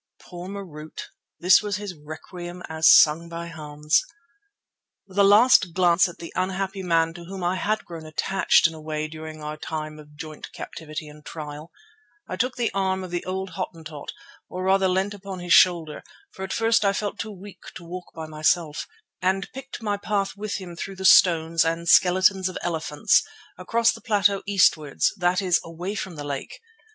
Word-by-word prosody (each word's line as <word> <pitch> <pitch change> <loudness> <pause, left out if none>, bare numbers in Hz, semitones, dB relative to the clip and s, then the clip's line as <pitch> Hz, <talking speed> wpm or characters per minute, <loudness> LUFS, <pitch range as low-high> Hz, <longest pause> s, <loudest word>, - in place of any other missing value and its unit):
Poor 180 +1 -9
Marût! 165 -6 -8 0.4
This 180 +2 +6
was 205 -2 -2
his 205 -2 -5
requiem 175 +4 -9
as 160 0 +3
sung 160 +2 +6
by 170 0 -6
Hans. 150 0 0 1.0
With 195 0 -6
a - - +7
last 205 -3 +6
glance 180 -1 +4
at 175 - -12
the 170 - -9
unhappy 190 +1 -2
man 165 -2 +1
to 170 0 -10
whom 190 +1 -7
I 175 +1 +1
had 215 +3 -1
grown 165 -2 -9
attached 195 +5 +2
in 165 - +3
a 160 - -10
way 155 0 -3
during 155 0 -9
our 150 0 -5
time 155 -1 -5
of 150 0 -15
joint 155 0 -9
captivity 155 -1 -7
and 150 0 -14
trial, 150 0 -8 0.6
I - - -4
took 250 +6 -1
the 240 -2 -1
arm 190 -1 0
of 185 - -8
the 175 -1 -2
old 190 +1 -4
Hottentot, 165 -5 -6 0.4
or 185 0 -5
rather 190 0 +3
leant 190 +2 0
upon 195 -1 -8
his 175 -1 0
shoulder, 170 -4 +4 0.3
for - - -12
at 190 - -5
first 225 -1 +2
I 200 -1 +3
felt 205 0 -3
too 220 - -4
weak 200 0 -12
to 180 - -9
walk 180 +2 -7
by 160 -1 -6
myself, 155 0 0 0.3
and 190 +1 0
picked 270 -3 -8
my 205 -2 0
path 200 -1 -2
with 210 0 -4
him 180 -3 -7
through 195 +3 -6
the 190 0 -6
stones 165 -3 +5
and 165 +1 -2
skeletons 185 +1 +4
of 185 - -6
elephants 160 -3 +2 0.3
across 230 +5 +2
the 225 - -10
plateau 205 -2 +2
eastwards, 160 -7 +2
that 180 +1 +1
is, 180 -2 +2
away 175 +4 -5
from 190 -4 -5
the 145 - -6
lake. 140 -2 -6
180 Hz, 185 wpm, -24 LUFS, 160-195 Hz, 1.0 s, a